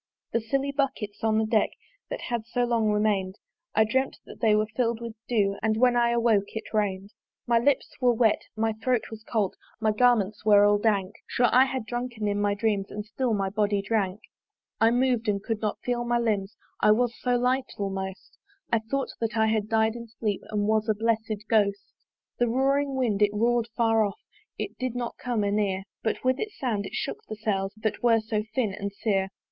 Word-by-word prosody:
The 230 - +1
silly 275 +5 -1
buckets 265 -8 -2
on 220 -1 +2
the 220 - +2
deck 215 -1 +2 0.4
That - - -4
had 235 -2 -3
so 245 +1 0
long 230 -3 +1
remain'd, 210 -2 +1 0.4
I 220 - +6
dreamt 260 +5 0
that - - -12
they 220 -3 +4
were 215 0 +2
fill'd 235 -2 +1
with 235 -1 -6
dew 200 -4 +1
And 220 0 +1
when 245 +1 +4
I 240 0 +3
awoke 230 -4 +2
it 220 - -6
rain'd. 200 -2 -1 0.3
My 235 -1 +3
lips 270 +2 +2
were 250 -1 +5
wet, 225 -2 +3
my 220 0 0
throat 230 +2 -1
was 220 -1 -8
cold, 215 -5 -1 0.2
My 220 -1 +2
garments 215 -3 +2
all 215 -1 +4
were 205 0 +6
dank; 205 -3 +1
Sure 245 -1 +2
I 255 +1 +6
had 260 -3 -3
drunken 240 -2 -3
in 205 0 0
my 205 0 +1
dreams 205 -2 0
And 210 0 -6
still 235 +1 -1
my 195 -1 -1
body 205 0 +1
drank. 200 -2 -1 0.6
I 225 - +5
mov'd 245 -1 +1
and 200 -1 0
could 225 -2 -2
not 210 -2 -1
feel 245 -1 -1
my 240 0 +1
limbs, 215 -4 -1 0.2
I - - +4
was 240 +1 +1
so 250 -1 +1
light, 255 +2 +1
almost 190 -1 -5 0.3
I 230 - +5
thought 265 +5 -3
that 225 -1 -2
I 220 - +4
had 220 -1 0
died 220 0 +2
in 235 0 -7
sleep, 215 -2 -3
And 210 -1 0
was 220 0 +1
a 215 - +3
blessed 220 -1 -1
Ghost. 200 -3 +1 0.5
The 240 -1 +2
roaring 275 +3 +1
wind! 230 -6 0
it 205 0 +3
roar'd 235 +1 +2
far 225 -2 +3
off, 200 -2 -2 0.4
It - - -5
did 255 -1 -2
not 240 -1 -4
come 240 -4 -1
anear; 200 -2 0 0.2
But 220 - -2
with 255 +1 +2
its 430 -1 -4
sound 215 -7 -1
it - - -8
shook - - -3
the 215 - -4
sails 195 -3 -1
That 215 -1 -2
were 230 -2 +4
so 215 -1 -2
thin 230 -7 +1
and 200 0 -4
sere. 195 -2 0
220 Hz, 205 wpm, -27 LUFS, 205-240 Hz, 0.6 s, I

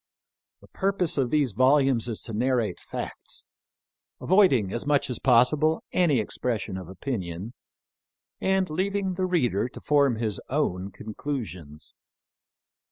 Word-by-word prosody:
The - - -17
purpose 190 -6 0
of 130 -3 +1
these 145 -4 +2
volumes 130 +1 +3
is 110 - -3
to 115 - -6
narrate 120 -3 0
facts, - - -5 0.7
avoiding 140 - +3
as 120 - -2
much 145 -3 +1
as 125 - -2
possible 145 +6 +3
any 160 -8 +3
expression 110 -2 -2
of 95 -2 -7
opinion, 95 -1 -5 0.9
and 190 -1 +1
leaving 190 +3 -1
the 185 +1 -1
reader 125 - +1
to - - -10
form 140 -4 +3
his 110 -2 -2
own 100 -10 -1
con 105 +3 -9
clusions. 90 - -6
130 Hz, 130 wpm, -26 LUFS, 105-155 Hz, 0.9 s, volumes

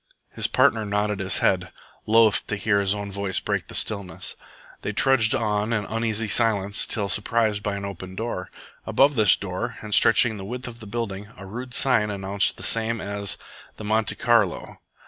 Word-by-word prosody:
His - - -1
partner 110 -1 +3
nodded 105 0 -1
his 95 -1 0
head, - - +1 0.4
loth 110 -1 +4
to 105 - -1
hear 100 0 +1
his 100 0 +1
own 100 -1 -5
voice 100 -1 -1
break - - -2
the - - -10
stillness. 100 -6 -3 0.5
They 105 - -3
trudged 110 -1 +4
on 105 0 0
in 105 -2 0
uneasy 115 -1 -1
silence 100 -2 +1
till 105 -2 -1
surprised 105 +1 +1
by 105 -1 -2
an 100 0 -5
open 95 -1 -7
door. 110 -4 -4 0.4
Above 140 +2 +4
this 110 -7 +5
door, 100 +5 -4
and 105 -1 -5
stretching 110 +1 +5
the 95 - -7
width 125 +4 -6
of 120 -1 -9
the 110 - -10
building, 105 -2 -4
a 100 - -10
rude 125 +6 -7
sign 110 -6 +3
announced 100 0 -1
the - - -9
same 115 0 0
as 100 -2 -3 0.4
the - - -8
"Monte 110 +1 +1
Carlo." - - +1
105 Hz, 185 wpm, -24 LUFS, 100-115 Hz, 0.5 s, this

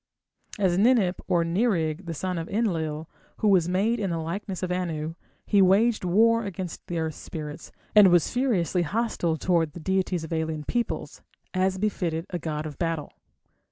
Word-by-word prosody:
As 185 -3 +2
Ninip 210 -5 +3
or 170 -1 +2
Nirig, 170 -2 0
the 165 - -4
son 180 +2 -2
of 165 - -6
Enlil, 165 -8 -1 0.3
who 215 - +1
was 180 -3 +4
made 210 +6 +1
in 200 -3 -1
the 170 - -1
likeness 185 +4 -4
of 180 - -1
Anu, 165 -3 -2 0.3
he 200 -2 +4
waged 210 +5 +4
war 230 +6 +4
against 185 -4 -6
the 175 - -3
earth 160 -1 -1
spirits, 150 0 -8 0.2
and 210 -2 +8
was 175 -3 +3
furiously 205 -9 +1
hostile 175 -3 -1
towards 165 -1 +1
the - - -8
deities 185 0 0
of 160 - -5
alien 160 -1 -2
peoples, 240 +8 -3 0.3
as 190 0 +1
befitted 180 -5 -1
a 175 - -2
god 155 -1 -3
of 150 -3 -7
battle. 165 -3 -2
180 Hz, 170 wpm, -26 LUFS, 160-200 Hz, 0.3 s, and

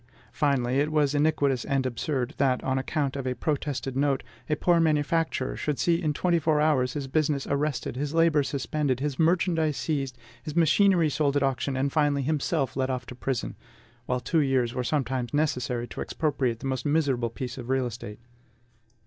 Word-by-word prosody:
Finally, 135 -3 +1
it 150 +2 +1
was 150 -2 +2
iniquitous 145 -4 +2
and 135 -1 0
absurd, 130 +2 -2
that, 130 -2 +1
on 130 0 0
account 140 0 -1
of 135 -2 -3
a 125 - -1
protested 135 -2 -2
note, 140 -1 +1 0.3
a 150 - +2
poor 170 +3 +3
manufacturer 155 -3 +1
should 150 -2 -2
see 170 0 +2
in 155 -3 +1
twenty 170 +3 +1
four 155 -1 +2
hours 135 -5 +2
his 145 -2 -3
business 145 -1 0
arrested, 140 -3 -1
his 140 +2 -2
labor 165 -2 +4
suspended, 140 0 -1
his 140 -1 -3
merchandise 165 -2 +2
seized, 135 -5 -2 0.2
his 155 -1 -7
machinery 170 +1 +4
sold 145 -1 +1
at 140 - +1
auction, 135 0 -1
and 140 +1 0
finally 145 -3 +2
himself 145 -1 -1
led 130 0 0
off 130 -1 -2
to 125 - -8
prison, 130 0 -3 0.5
while 125 0 0
two 160 +7 0
years 130 -4 +1
were 125 - -2
sometimes 130 -1 -1
necessary 125 -5 0
to - - -7
expropriate 130 -7 -1
the - - -6
most 130 -2 -2
miserable 140 -6 +1
piece 125 +2 -6
of 120 0 -8
real 130 -1 +1
estate. 110 -3 -7
140 Hz, 185 wpm, -27 LUFS, 130-155 Hz, 0.5 s, labor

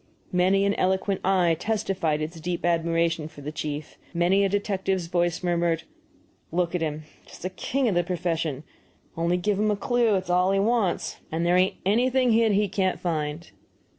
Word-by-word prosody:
Many 190 +2 +3
an 200 - +2
eloquent 190 +1 +1
eye 180 -3 +3
testified 190 -8 -1
its 165 +2 -6
deep 175 +2 -3
admiration 165 -2 +1
for 145 - -13
the 145 +2 -5
chief, 150 -1 -5
and 170 - -4
many 190 +3 +4
a 195 - +2
detective's 190 -2 -1
voice 175 0 0
murmured, 170 -2 +1 0.7
"Look 175 +1 0
at 180 - -1
him 155 -1 -2 0.2
just - - -13
the 185 - -3
king 260 +7 -1
of 210 - +2
the 175 0 +2
profession; 165 -5 -2 0.5
only 170 +2 +1
give 195 +2 0
him 215 0 +2
a 210 - +2
clue, 235 0 +2
it's 185 -1 -2
all 180 +2 +3
he 195 - +2
wants, 210 -3 0
and 165 +2 -1
there 175 +1 +3
ain't 185 +1 +3
anything 250 +4 +3
hid 225 0 +4
that - - +2
he 205 +1 +2
can't 190 -1 0
find." 155 -1 -3
180 Hz, 190 wpm, -25 LUFS, 165-195 Hz, 0.7 s, many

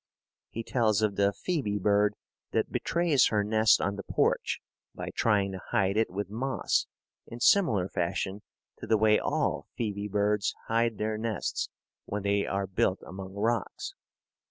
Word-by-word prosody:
He 115 - -5
tells 110 -3 +1
of 105 -2 +1
the 100 0 +3
phoebe 130 - -2
bird 105 +1 +2 0.4
that - - 0
betrays 170 -6 +2
her 105 -2 +1
nest 110 +1 +4
on 100 0 -1
the 100 - -5
porch - - 0 0.4
by - - -5
trying 100 -3 +2
to 95 -1 -6
hide 100 0 +2
it 110 +1 +2
with 95 +2 -3
moss 130 +6 0 0.4
in 115 - -8
similar 120 - +4
fashion 95 +3 -2 0.4
to - - -7
the 110 - +4
way 105 0 +4
all - - -1
phoebe 105 -3 -2
birds 105 0 +1
hide 115 -1 +1
their 110 0 -2
nests 110 -1 -2 0.4
when 100 -1 -4
they 100 0 +1
are 100 0 -1
built 95 0 0
among 95 0 -8
rocks. 115 +1 -1
105 Hz, 155 wpm, -29 LUFS, 100-115 Hz, 0.4 s, nest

